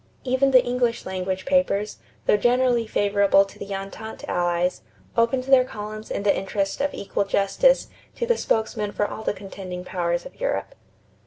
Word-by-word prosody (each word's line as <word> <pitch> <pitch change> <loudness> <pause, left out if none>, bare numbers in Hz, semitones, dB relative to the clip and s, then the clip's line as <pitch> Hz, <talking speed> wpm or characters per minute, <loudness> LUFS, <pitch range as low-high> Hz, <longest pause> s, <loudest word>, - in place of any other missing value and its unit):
Even 260 +1 +2
the 255 -2 +6
English 245 -1 0
language 185 0 -3
papers, 275 -7 +1 0.3
though - - +5
generally 240 +1 +2
favorable 200 -1 +3
to 195 - -15
the 200 - -7
Entente 195 +3 -7
Allies, 175 0 0 0.3
opened 235 +3 +2
their 265 -1 +5
columns 215 -2 -7
in - - -3
the 205 - +3
interest 195 +3 -2
of 285 - +1
equal 200 0 -1
justice 200 - +2 0.3
to 475 - -2
the 475 0 +3
spokesmen 215 - -1
for 205 - 0
all - - -7
the - - 0
contending 185 -2 -7
powers 175 -1 -1
of - - -12
Europe. - - -1
210 Hz, 165 wpm, -24 LUFS, 195-250 Hz, 0.3 s, the